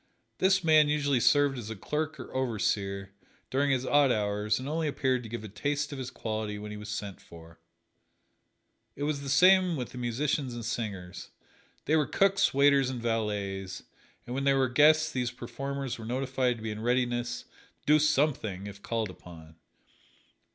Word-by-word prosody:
This 190 0 +3
man 155 -2 +5
usually 145 -3 +1
served 140 +2 +3
as 110 -2 -7
a 110 - -5
clerk 155 +9 -3
or - - -9
overseer, 100 -6 -1 0.4
during 140 +2 +2
his 130 -1 +1
odd 145 -1 +4
hours, 105 -1 0
and 130 - -6
only 160 +1 -1
appeared 130 -3 0
to 115 - -9
give 115 -1 -5
a - - -6
taste 145 +9 -2
of 140 - -6
his 130 - -4
quality 110 -2 -4
when 105 0 -7
he - - -6
was 105 0 -8
sent 105 -2 -5
for. 85 0 -14 1.4
It 145 - -5
was 145 -1 -1
the 140 - -6
same 185 +4 +5
with 125 -5 -5
the 125 - -8
musicians 130 +2 -1
and 120 -2 -6
singers 100 -6 -5 0.6
they 155 - +2
were 150 -3 +2
cooks, 195 0 +3
waiters 140 -1 +4
and 130 -2 -4
valets, 100 -4 -2 0.4
and 120 - -6
when 135 +2 -2
there 140 -1 +3
were 130 -2 +2
guests 155 +4 +5
these 125 -3 -1
performers 135 +2 -5
were 110 - -7
notified 130 0 0
to 110 - -11
be 110 - -3
in 105 0 -6
readiness 120 0 0
to - - -31 0.4
"do 150 +1 +5
something" 140 -10 +1
if 100 0 -9
called 110 -3 -2
upon. 80 -3 -14
125 Hz, 180 wpm, -29 LUFS, 105-145 Hz, 1.4 s, man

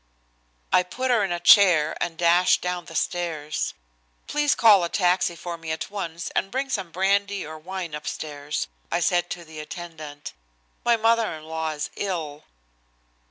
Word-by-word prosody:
I - - +7
put 250 +9 -2
her 230 -4 +3
in 195 - -1
a 175 - -1
chair 170 -4 +6
and 170 -2 -2
dashed 175 +2 +4
down 180 -1 -2
the 165 - -11
stairs. 155 - -2 0.5
"Please 295 0 +1
call 210 -5 +6
a 170 - -1
taxi 180 -2 +2
for 170 0 -6
me 165 -1 -8
at 160 +4 -3
once, 175 -4 -5
and 195 - -1
bring 265 +4 -2
some 195 -7 -2
brandy 200 +2 +1
or 155 +1 -8
wine 180 0 -6
upstairs," 150 -1 -4 0.2
I - - +1
said 175 -1 +1
to 175 -1 -6
the 155 -1 -10
attendant. 155 -2 -8 0.5
"My 235 -1 +4
mother 225 0 +2
in 155 - -11
law 160 0 -3
is 150 -1 -4
ill." 160 -7 -4
175 Hz, 165 wpm, -24 LUFS, 160-195 Hz, 0.5 s, I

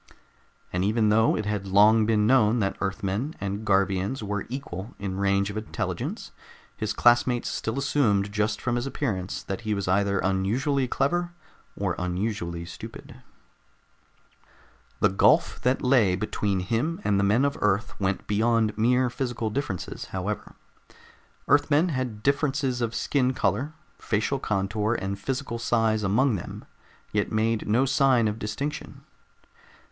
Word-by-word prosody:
And 90 +1 0
even 110 +2 +2
though 110 +1 +3
it 110 - -3
had 105 -2 -2
long 105 +3 +5
been 105 -2 +3
known 115 -2 +4
that 100 -4 0
Earthmen 100 +8 -2
and 100 +2 -3
Garvians 100 +3 +1
were 105 -1 -3
equal 115 -6 -6
in 95 -1 -4
range 100 0 +1
of 105 - -6
intelligence, 110 - -4 0.4
his 110 -1 -2
classmates 120 +2 +3
still 110 +3 -3
assumed 115 -8 +1
just 105 +1 0
from 120 -1 -1
his 120 +3 -2
appearance 100 -10 -3
that 95 +3 -5
he 110 -2 -1
was 100 -2 -3
either 100 +1 +2
unusually 115 +10 0
clever 175 +8 0 0.4
or 95 -3 -1
unusually 90 -2 -3
stupid. 85 - -10 1.8
The 105 - +5
gulf 95 - +3
that 125 +2 +1
lay 120 -8 +4
between 100 -1 -1
him 120 - -1
and 100 -1 +2
the - - +2
men 110 +7 +3
of 140 - 0
Earth 105 0 +1
went 95 -1 -1
beyond 110 +1 +1
mere 125 +3 +3
physical 120 -3 -3
differences, 115 -8 -4
however. 95 +3 -5 0.9
Earthmen 145 +4 +3
had 125 -7 -3
differences 140 -2 +1
of 115 -1 -1
skin 130 -2 +1
color, 115 +10 0 0.3
facial 110 +6 -1
contour 105 +1 -1
and 100 +1 -4
physical 130 0 -3
size 115 -2 +1
among 110 +4 +2
them, 85 - -8 0.5
yet - - 0
made 110 +1 0
no 120 +6 +3
sign 130 -3 +3
of 105 +1 -3
distinction. 120 +8 -5
110 Hz, 140 wpm, -26 LUFS, 100-125 Hz, 1.8 s, long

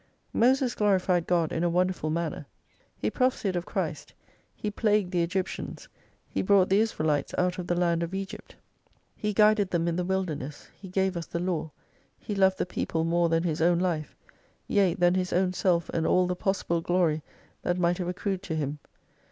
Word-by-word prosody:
Moses 255 +1 +3
glorified 185 -4 +2
God 170 -3 +2
in 165 - -1
a 175 - +2
wonderful 180 -2 0
manner; 160 -3 -3 0.5
he - - -1
prophesied 250 -7 0
of 175 0 -3
Christ, - - -4 0.4
he 210 - -3
plagued 205 -3 +1
the 175 -2 +1
Egyptians, 180 +2 -3 0.4
he - - -2
brought 190 -1 +4
the 195 +2 +4
Israelites 155 -10 0
out 180 0 +1
of 180 - -5
the 175 - +1
land 170 -1 +1
of 170 +3 -3
Egypt, 195 0 -7 0.6
he 210 - -2
guided 210 -1 +4
them 170 -2 0
in 170 0 0
the 180 - 0
wilderness, 175 -6 -3
he 190 - -11
gave 190 0 0
us 170 -2 -4
the - - -4
law, 170 -2 -2 0.5
he 210 - -5
loved 190 -1 +3
the - - 0
people 165 -2 -2
more 170 +1 +2
than 165 0 +2
his 160 -2 -1
own 170 +1 +4
life: 170 -4 -1 0.5
yea, 195 -4 +3
than 175 0 +3
his 185 -1 -1
own 180 0 +2
self 175 -2 +1
and 165 -1 0
all 185 0 +4
the 180 0 -1
possible 180 -3 -1
glory 165 -3 +1 0.4
that 175 - 0
might 175 0 +1
have 180 - -2
accrued 185 +1 -2
to 180 -5 -4
him. 150 -1 -2
180 Hz, 190 wpm, -27 LUFS, 170-190 Hz, 0.6 s, brought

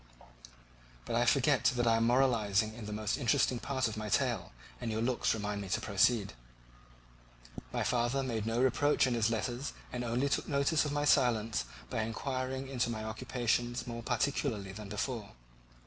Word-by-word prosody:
But - - -2
I 120 +1 +3
forget 130 0 +3
that 120 0 +1
I 115 -1 +4
am 115 0 +2
moralizing 110 -4 +2
in 110 -2 -8
the - - -5
most 105 0 -1
interesting 120 0 +2
part 130 -2 -1
of 110 -1 -5
my 110 0 -4
tale, - - 0 0.3
and - - -2
your 110 0 -1
looks 120 0 +1
remind 105 -1 -3
me 100 - -6
to - - +1
proceed. 105 - +2 1.4
My - - -1
father 125 +3 +1
made 115 -4 -2
no 115 +1 0
reproach 130 +3 +3
in 125 - 0
his 115 -1 +2
letters 120 +4 -2 0.2
and 125 0 -2
only 120 +4 0
took 140 - -1
notice 145 +3 +2
of 145 - -2
my 145 0 0
silence 115 - +2 0.3
by - - 0
inquiring 130 +3 -3
into 125 -3 -1
my 110 -2 -3
occupations 120 +2 -1
more 115 -1 -5
particularly 120 -4 -1
than 105 +1 -8
before. 110 0 -3
120 Hz, 175 wpm, -32 LUFS, 110-130 Hz, 1.4 s, I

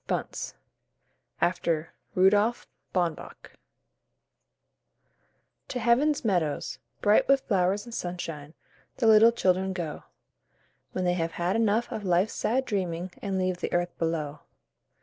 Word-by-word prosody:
BUNCE - - -3 0.9
(after 170 -2 0 0.2
RUDOLF 205 +5 +3 0.3
BAUNBACH) 175 -4 -3 2.1
To 250 - -3
Heaven's 255 +4 +2
Meadows, 175 -8 0 0.2
bright 205 0 +4
with 275 0 +4
flowers 195 -2 +1
and 235 - -10
sunshine, 165 -6 -5 0.4
The 240 - 0
little 220 +1 +7
children 190 -4 +1
go, 170 -5 -5 0.9
When 185 - -1
they 175 - +3
have 165 -2 -2
had 175 +3 -1
enough 225 +1 +1
of 220 -3 -4
life's 185 +2 +2
sad 260 +4 0
dreaming, 180 -4 -2
And 195 -1 -2
leave 185 -1 0
the - - -4
earth 175 0 0
below. 160 -3 -2
185 Hz, 120 wpm, -27 LUFS, 175-220 Hz, 2.1 s, little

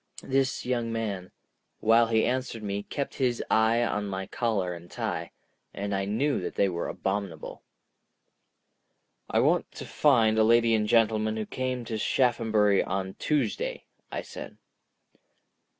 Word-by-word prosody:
This 135 0 0
young 120 -2 -1
man, 100 -5 -3 0.5
while 115 +1 +5
he 110 -1 +2
answered 125 -3 -2
me, 100 0 -2
kept 140 +6 -4
his 125 -2 +1
eye 110 +2 +4
on 105 -3 -1
my 95 -1 -3
collar 100 -5 -1
and 85 0 -11
tie—and 100 +3 -6
I 95 0 0
knew 115 +6 0
that - - -5
they 100 - +3
were 85 -2 -3
abominable. 95 -5 -4 1.7
"I - - +2
want - - +2
to - - -7
find 110 -1 +3
a - - +6
lady 115 +1 +4
and 105 -1 +2
gentleman 110 -1 +2
who 110 - -2
came 130 0 -3
to 110 -1 -3
Shaphambury 110 -5 +2
on 95 0 -3
Tuesday," 140 -8 -1 0.3
I - - -3
said. - - -9
110 Hz, 140 wpm, -28 LUFS, 100-120 Hz, 1.7 s, a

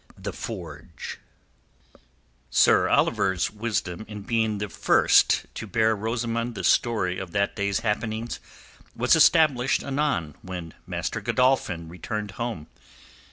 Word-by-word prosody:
THE - - -5
FORGE - - -7 1.3
Sir - - +4
Oliver's 95 -3 +2
wisdom 105 -4 -3
in 105 -2 -8
being 110 -1 0
the 105 +1 -3
first 85 - +3
to - - -6
bear 110 0 +2
Rosamund 115 +2 -2
the 95 - -5
story 95 -3 +2
of 95 -3 -7
that 100 0 0
day's 100 +1 -1
happenings 110 +1 -2 0.6
was - - +4
established 140 -6 +4
anon 135 - -1
when 90 -3 -7
Master - - -3
Godolphin 125 -11 +1
returned 105 +4 -5
home. 115 -7 -4
110 Hz, 115 wpm, -25 LUFS, 95-115 Hz, 1.3 s, Sir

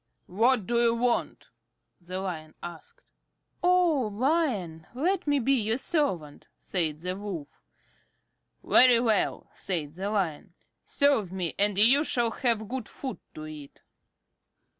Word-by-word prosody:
"What 225 +3 +2
do 235 +2 +1
you 235 -1 +3
want?" 240 +1 -1 0.5
the 180 +1 -6
Lion 160 -5 -6
asked. 175 -2 -10 0.6
"O 350 -8 +3
Lion, 215 - -1
let 355 +6 -1
me 290 0 +3
be 270 +1 +2
your 225 -2 +1
servant," 225 - -2
said 160 -4 -2
the 180 +1 -3
Wolf. 190 -7 -7 1.0
"Very 245 -2 +6
well," 225 -4 0
said 160 -6 -2
the 190 +4 -4
Lion, 180 -3 -2 0.3
"serve 275 - +2
me, 185 -3 -3
and 205 -1 +3
you 250 +8 +6
shall 240 -6 +1
have 225 -4 -1
good 250 -1 -5
food 265 -2 -6 0.2
to 155 - -7
eat." 150 -2 -11
215 Hz, 130 wpm, -27 LUFS, 175-260 Hz, 1.0 s, Very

